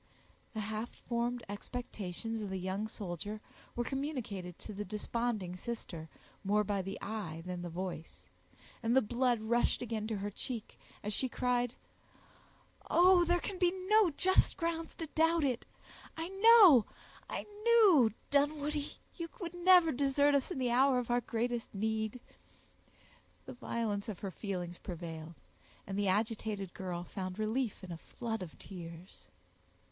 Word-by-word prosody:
The 215 - -1
half 220 +2 -3
formed 240 0 -2
expectations 220 0 -5
of 205 - -4
the 190 - -2
young 190 +3 -2
soldier 205 0 -5 0.4
were 240 - 0
communicated 240 - -4
to 215 - -9
the 205 +1 -4
desponding 210 -3 -2
sister, 180 -6 -6 0.3
more 210 +2 +3
by 200 -1 0
the 195 +1 -5
eye 190 -7 -4
than 180 -1 -4
the 175 - -4
voice, 175 -1 -6 0.6
and 235 +1 +2
the 265 - +6
blood 240 +2 +1
rushed 235 +2 +2
again 220 -3 -3
to 220 -2 -2
her 205 +1 -3
cheek, 230 +2 -5 0.2
as 210 +1 -1
she 260 +5 +3
cried,— 245 0 0 1.1
"Oh, 360 0 +6
there 350 +1 +3
can 375 +1 -4
be 355 -2 +4 0.2
no 430 -3 +6
just 375 +5 +3
grounds 330 -1 -2
to 325 - -4
doubt 325 +1 +2
it. 255 -4 0 0.5
I 325 +2 -3
know—I 390 - +5 0.2
knew—Dunwoodie, 295 - +3 0.2
you 335 -2 -4
would 345 -3 -5
never 350 -2 +6
desert 285 +2 +3
us 280 -2 +2
in 360 - -4
the 250 -2 +1
hour 260 +2 +5
of 245 -1 -1
our 245 0 +3
greatest 235 -1 -2
need!" 220 +3 -1 1.3
The - - -7
violence 230 -4 -2
of 205 - -4
her 195 - -3
feelings 180 -3 -4
prevailed, 165 -2 -7 0.5
and 195 - -5
the 205 0 +1
agitated 210 -1 -1
girl 180 -2 -4
found 185 +1 -5
relief 220 0 -1
in 185 - -7
a 170 - -5
flood 225 +4 -5
of 175 -4 -8
tears. 170 -1 -10
225 Hz, 150 wpm, -33 LUFS, 195-275 Hz, 1.3 s, the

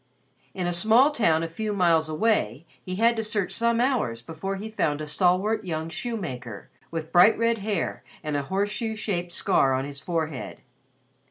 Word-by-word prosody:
In 185 - -2
a 175 - 0
small 225 - +5
town 165 - +2
a - - -2
few 210 +6 -4
miles 165 -5 +2
away 155 - 0 0.2
he 185 - -5
had 230 +4 +3
to 220 - -1
search 210 -3 0
some 235 +3 +1
hours 235 - 0
before 165 +7 -5
he 205 +3 -6
found 150 -8 0
a 155 - -4
stalwart 185 +8 +1
young 160 -3 -4
shoemaker 135 - -6 0.2
with 160 -1 -5
bright 180 +5 +6
red 230 0 +1
hair 200 -4 -2 0.2
and 150 -1 -2
a 145 - +1
horseshoe 205 +7 -2
shaped 180 -5 -3
scar 135 -5 +2
on 130 +1 -2
his 140 -1 -7
forehead. 160 -5 -4
180 Hz, 175 wpm, -25 LUFS, 155-220 Hz, 0.2 s, bright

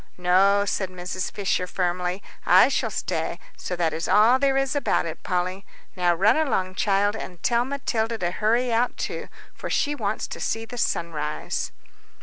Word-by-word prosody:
"No," 195 +3 +4
said 190 -1 -1
Mrs. 185 0 -4
Fisher, 190 -2 -1
firmly, 180 +1 -2 0.2
"I - - +6
shall - - 0
stay, - - -2 0.2
so 180 - -4
that 165 -2 0
is 160 +2 -3
all 230 +5 +5
there 270 -1 +2
is 270 +1 0
about 285 - +1
it, 160 - -6
Polly. 185 +2 -2 0.3
Now 175 -1 +2
run 205 +7 +4
along, 220 -12 0
child, 205 +1 +1
and 180 -5 -8
tell 240 0 +2
Matilda 235 -5 -1
to 175 -4 -1
hurry 230 +5 +1
out 240 +2 +1
too, - - -4 0.3
for - - -7
she 290 - +1
wants 215 -6 -2
to - - -6
see 225 0 -2
the 245 +1 -7
sunrise." 150 -6 -2
200 Hz, 170 wpm, -24 LUFS, 180-235 Hz, 0.3 s, I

